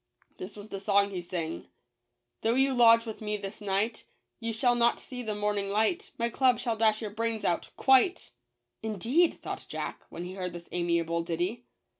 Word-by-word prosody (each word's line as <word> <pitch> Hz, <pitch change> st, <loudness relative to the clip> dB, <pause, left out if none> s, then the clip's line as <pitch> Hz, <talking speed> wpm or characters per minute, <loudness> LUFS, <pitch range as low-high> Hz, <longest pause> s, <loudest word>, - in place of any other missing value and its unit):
This 190 Hz, +2 st, -7 dB
was 210 Hz, 0 st, -10 dB
the 195 Hz, -, -5 dB
song 200 Hz, +1 st, +3 dB
he 185 Hz, -2 st, -3 dB
sang: 170 Hz, -2 st, -4 dB, 0.2 s
— 120 Hz, 0 st, -53 dB
" 120 Hz, 0 st, -54 dB
Though 225 Hz, +1 st, +2 dB
you 270 Hz, +1 st, +3 dB
lodge 230 Hz, -2 st, +6 dB
with 220 Hz, -1 st, -7 dB
me 210 Hz, -1 st, -2 dB
this 200 Hz, +2 st, -8 dB
night, 205 Hz, +3 st, -1 dB, 0.3 s
You 230 Hz, 0 st, -2 dB
shall 240 Hz, +2 st, +2 dB
not 235 Hz, 0 st, +3 dB
see 250 Hz, -1 st, -7 dB
the 215 Hz, -3 st, -3 dB
morning 205 Hz, -1 st, -1 dB
light; 220 Hz, -, +1 dB
My 235 Hz, -, +1 dB
club 250 Hz, +1 st, +3 dB
shall 235 Hz, -2 st, -1 dB
dash 220 Hz, 0 st, +2 dB
your 210 Hz, -, -4 dB
brains 225 Hz, 0 st, -2 dB
out 170 Hz, -, 0 dB
— -, -, -45 dB
quite 265 Hz, +7 st, +4 dB, 0.3 s
!" 120 Hz, 0 st, -55 dB
"Indeed, 230 Hz, -, +1 dB
''thought -, -, -6 dB
Jack, -, -, -5 dB
when 170 Hz, -, -6 dB
he 180 Hz, -, -6 dB
heard 180 Hz, -2 st, -4 dB
this 170 Hz, 0 st, -9 dB
amiable 170 Hz, -1 st, 0 dB
ditty. 175 Hz, +8 st, -3 dB
210 Hz, 205 wpm, -29 LUFS, 180-230 Hz, 0.3 s, lodge